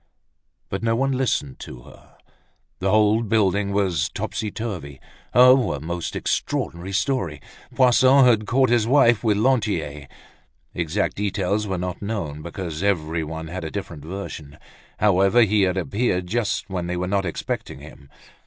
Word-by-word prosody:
But 95 Hz, -, -3 dB
no 115 Hz, 0 st, +1 dB
one 135 Hz, +3 st, +1 dB
listened 125 Hz, -, -1 dB
to -, -, -10 dB
her. -, -, -18 dB, 0.6 s
The 95 Hz, -, 0 dB
whole 110 Hz, +2 st, +4 dB
building 100 Hz, -2 st, +1 dB
was 95 Hz, -7 st, 0 dB
topsy 110 Hz, -1 st, -4 dB
turvy. 95 Hz, -, -6 dB, 0.3 s
Oh! 125 Hz, -, +6 dB
a 75 Hz, -, -4 dB
most 85 Hz, +3 st, -5 dB
extraordinary 85 Hz, +3 st, -2 dB
story. 95 Hz, -, -1 dB, 0.4 s
Poisson 130 Hz, +1 st, +5 dB
had 110 Hz, -4 st, +3 dB
caught 130 Hz, +3 st, +2 dB
his 115 Hz, -2 st, +2 dB
wife 120 Hz, -4 st, +4 dB
with 105 Hz, -3 st, +2 dB
Lantier. 105 Hz, -, 0 dB, 0.7 s
Exact 85 Hz, +4 st, -1 dB
details 100 Hz, +1 st, -1 dB
were 95 Hz, -2 st, -2 dB
not 90 Hz, 0 st, -4 dB
known, 95 Hz, -9 st, -4 dB
because 85 Hz, -1 st, -6 dB
everyone 80 Hz, -4 st, -2 dB
had 90 Hz, +1 st, -5 dB
a 80 Hz, -, -4 dB
different 85 Hz, -5 st, -7 dB
version. 80 Hz, -5 st, -7 dB, 0.4 s
However, 100 Hz, +3 st, +4 dB
he 105 Hz, -1 st, +2 dB
had 95 Hz, -1 st, +1 dB
appeared 95 Hz, -, -1 dB
just 105 Hz, 0 st, -1 dB
when 90 Hz, -3 st, -4 dB
they 90 Hz, 0 st, -2 dB
were 90 Hz, -, -1 dB
not 100 Hz, +1 st, 0 dB
expecting 85 Hz, -3 st, -4 dB
him. 70 Hz, -, -14 dB
100 Hz, 150 wpm, -23 LUFS, 85-110 Hz, 0.7 s, Oh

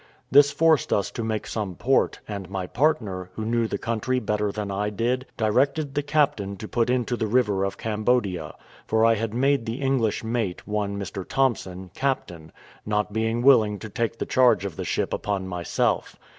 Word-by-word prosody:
This 145 Hz, +1 st, +7 dB
forced 160 Hz, +1 st, +3 dB
us 100 Hz, -2 st, +1 dB
to 115 Hz, -, -4 dB
make 110 Hz, -1 st, -2 dB
some 100 Hz, -5 st, -4 dB
port; 130 Hz, +7 st, +1 dB
and 100 Hz, -3 st, -6 dB
my 95 Hz, -1 st, -3 dB
partner, 105 Hz, -, 0 dB
who 110 Hz, -, -4 dB
knew 115 Hz, 0 st, +1 dB
the -, -, -2 dB
country 115 Hz, +3 st, -1 dB
better 105 Hz, -2 st, -1 dB
than 105 Hz, -1 st, -4 dB
I 100 Hz, +2 st, -1 dB
did, 120 Hz, +5 st, -1 dB
directed 135 Hz, +6 st, +1 dB
the 145 Hz, -, 0 dB
captain 140 Hz, -10 st, 0 dB
to 110 Hz, -, -7 dB
put 120 Hz, +1 st, 0 dB
into 125 Hz, -1 st, +1 dB
the 110 Hz, -, -1 dB
river 105 Hz, -4 st, +2 dB
of 100 Hz, -, -2 dB
Cambodia; 105 Hz, -7 st, -1 dB, 0.3 s
for 110 Hz, 0 st, +3 dB
I 115 Hz, -, +5 dB
had 110 Hz, 0 st, -3 dB
made 135 Hz, -1 st, +2 dB
the 115 Hz, +4 st, -3 dB
English 130 Hz, -5 st, 0 dB
mate, 110 Hz, -5 st, -2 dB
one 105 Hz, -1 st, -2 dB
Mr. 95 Hz, -1 st, -5 dB
Thompson, 95 Hz, -8 st, -1 dB
captain, 90 Hz, -, -3 dB, 0.3 s
not 105 Hz, -1 st, -1 dB
being 115 Hz, +2 st, 0 dB
willing 110 Hz, -6 st, +5 dB
to 110 Hz, -, -8 dB
take 115 Hz, +1 st, -2 dB
the -, -, -3 dB
charge 120 Hz, -7 st, +3 dB
of 95 Hz, -5 st, -5 dB
the -, -, -5 dB
ship -, -, -1 dB
upon 100 Hz, -2 st, -2 dB
myself. 90 Hz, -2 st, -1 dB
110 Hz, 185 wpm, -25 LUFS, 100-125 Hz, 0.3 s, This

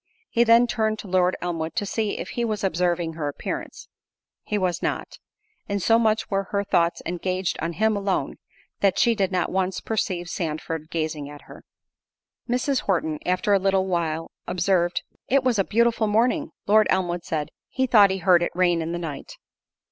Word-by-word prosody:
He 235 Hz, -, +4 dB
then 230 Hz, +1 st, +6 dB
turned 220 Hz, -2 st, 0 dB
to 210 Hz, -, -9 dB
Lord 185 Hz, 0 st, +2 dB
Elmwood 165 Hz, -2 st, -3 dB
to 205 Hz, -, -1 dB
see 215 Hz, +1 st, -2 dB
if -, -, -5 dB
he 240 Hz, -, -2 dB
was 215 Hz, -2 st, -2 dB
observing 175 Hz, -2 st, 0 dB
her 155 Hz, -2 st, -3 dB
appearance—he 145 Hz, +7 st, -7 dB
was 180 Hz, -3 st, -1 dB
not—and 420 Hz, -, -6 dB
so 225 Hz, +5 st, +4 dB
much 220 Hz, -1 st, +1 dB
were 195 Hz, 0 st, 0 dB
her 200 Hz, +2 st, -1 dB
thoughts 170 Hz, -4 st, +1 dB
engaged 185 Hz, +1 st, -2 dB
on 165 Hz, +2 st, -2 dB
him 220 Hz, +3 st, +2 dB
alone, 200 Hz, -2 st, -1 dB, 0.4 s
that 195 Hz, -2 st, +2 dB
she 235 Hz, -, +4 dB
did 195 Hz, -4 st, 0 dB
not 180 Hz, -2 st, 0 dB
once 190 Hz, 0 st, 0 dB
perceive 185 Hz, -5 st, -2 dB
Sandford 160 Hz, -2 st, -4 dB
gazing 155 Hz, -3 st, -3 dB
at 145 Hz, 0 st, -11 dB
her. -, -, -13 dB, 0.9 s
Mrs. 250 Hz, +2 st, +1 dB
Horton, 160 Hz, -5 st, -1 dB
after 185 Hz, +3 st, +2 dB
a 200 Hz, -, +5 dB
little 190 Hz, 0 st, +2 dB
while 165 Hz, -3 st, -2 dB, 0.2 s
observed, 180 Hz, -1 st, +1 dB, 0.2 s
"It 275 Hz, 0 st, +3 dB
was 245 Hz, -5 st, +2 dB
a -, -, +4 dB
beautiful 230 Hz, +1 st, +2 dB
morning." 245 Hz, +8 st, +1 dB, 0.2 s
Lord 215 Hz, +1 st, +5 dB
Elmwood 175 Hz, -2 st, 0 dB
said, 150 Hz, -3 st, -3 dB, 0.2 s
"He 260 Hz, -, 0 dB
thought 210 Hz, -5 st, +6 dB
he 190 Hz, -, -1 dB
heard 180 Hz, -2 st, +4 dB
it 175 Hz, -, 0 dB
rain 175 Hz, -2 st, +2 dB
in 165 Hz, +1 st, -3 dB
the -, -, -2 dB
night." 155 Hz, -5 st, -7 dB
190 Hz, 180 wpm, -24 LUFS, 170-215 Hz, 0.9 s, then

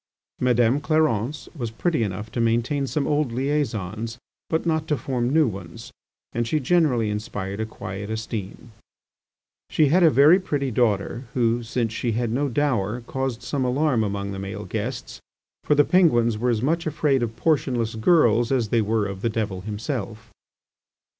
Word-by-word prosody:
Madame 125 Hz, +1 st, +3 dB
Clarence 150 Hz, -4 st, 0 dB
was 120 Hz, -6 st, -3 dB
pretty 155 Hz, +6 st, -1 dB
enough 105 Hz, +1 st, -3 dB
to 120 Hz, -, -1 dB
maintain 120 Hz, +5 st, +1 dB
some 145 Hz, +1 st, -1 dB
old 150 Hz, -4 st, +1 dB
liaisons, 115 Hz, -5 st, -2 dB, 0.3 s
but 160 Hz, +1 st, 0 dB
not 160 Hz, -2 st, 0 dB
to 150 Hz, -, +1 dB
form 125 Hz, -3 st, -1 dB
new 155 Hz, +1 st, +4 dB
ones, 95 Hz, -6 st, -8 dB, 0.4 s
and 120 Hz, 0 st, -1 dB
she 155 Hz, -, +1 dB
generally 130 Hz, -8 st, +2 dB
inspired 105 Hz, -1 st, -4 dB
a 110 Hz, -, -2 dB
quiet 100 Hz, -1 st, -7 dB
esteem. 110 Hz, +1 st, -5 dB, 1.0 s
She 155 Hz, -3 st, +3 dB
had 180 Hz, +6 st, +4 dB
a 165 Hz, -, +7 dB
very 150 Hz, +6 st, +6 dB
pretty 145 Hz, -8 st, -2 dB
daughter, 115 Hz, +1 st, 0 dB
who, 120 Hz, -1 st, +2 dB
since 115 Hz, -1 st, -2 dB
she 115 Hz, 0 st, -1 dB
had 115 Hz, 0 st, -1 dB
no 140 Hz, +4 st, 0 dB
dower, 120 Hz, -5 st, 0 dB
caused 130 Hz, -2 st, -4 dB
some 140 Hz, -3 st, -2 dB
alarm 130 Hz, -1 st, +1 dB
among 100 Hz, -1 st, -3 dB
the 95 Hz, -, -5 dB
male 95 Hz, 0 st, -6 dB
guests; -, -, -5 dB, 0.4 s
for 150 Hz, -, +2 dB
the 145 Hz, 0 st, +5 dB
Penguins 120 Hz, -, +3 dB
were 120 Hz, +4 st, 0 dB
as 115 Hz, -1 st, 0 dB
much 165 Hz, +4 st, 0 dB
afraid 150 Hz, -3 st, +1 dB
of 115 Hz, -1 st, -2 dB
portionless 125 Hz, -7 st, 0 dB
girls 120 Hz, -2 st, +3 dB
as 120 Hz, -5 st, +1 dB
they 115 Hz, 0 st, +2 dB
were 110 Hz, 0 st, 0 dB
of 100 Hz, -1 st, -5 dB
the 115 Hz, -, 0 dB
devil 105 Hz, -4 st, -3 dB
himself. 110 Hz, +1 st, -5 dB
120 Hz, 165 wpm, -24 LUFS, 110-145 Hz, 1.0 s, a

